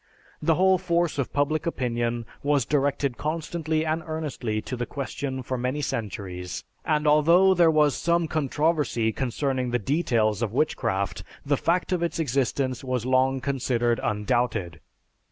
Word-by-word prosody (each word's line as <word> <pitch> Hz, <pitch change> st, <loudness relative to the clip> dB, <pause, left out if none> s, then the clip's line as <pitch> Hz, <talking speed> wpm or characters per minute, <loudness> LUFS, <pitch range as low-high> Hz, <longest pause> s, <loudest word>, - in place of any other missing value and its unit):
The 160 Hz, +1 st, +3 dB
whole 190 Hz, +1 st, +4 dB
force 170 Hz, -4 st, 0 dB
of 135 Hz, -, -1 dB
public 155 Hz, +4 st, 0 dB
opinion 120 Hz, -5 st, -1 dB, 0.2 s
was 140 Hz, -3 st, +2 dB
directed 140 Hz, -1 st, 0 dB
constantly 160 Hz, 0 st, -2 dB
and 160 Hz, +1 st, 0 dB
earnestly 145 Hz, -9 st, -3 dB
to 130 Hz, -, -4 dB
the 120 Hz, -1 st, -3 dB
question 135 Hz, -1 st, -4 dB
for 130 Hz, +1 st, -3 dB
many 130 Hz, +4 st, -1 dB
centuries, 95 Hz, -8 st, -4 dB, 0.2 s
and 150 Hz, -1 st, +1 dB
although 170 Hz, +6 st, +5 dB
there 170 Hz, -2 st, +5 dB
was 150 Hz, -2 st, +3 dB
some 170 Hz, 0 st, +1 dB
controversy 150 Hz, -6 st, 0 dB
concerning 130 Hz, +1 st, -1 dB
the 120 Hz, -, +1 dB
details 115 Hz, -, +1 dB
of 110 Hz, -3 st, -1 dB
witchcraft, 100 Hz, -9 st, -1 dB, 0.2 s
the 145 Hz, 0 st, +2 dB
fact 175 Hz, +6 st, 0 dB
of 180 Hz, -2 st, +1 dB
its 170 Hz, 0 st, -1 dB
existence 135 Hz, -3 st, -1 dB
was 125 Hz, -3 st, -2 dB
long 130 Hz, +1 st, +2 dB
considered 120 Hz, -4 st, 0 dB
undoubted. 105 Hz, -5 st, -1 dB
140 Hz, 145 wpm, -25 LUFS, 120-155 Hz, 0.2 s, although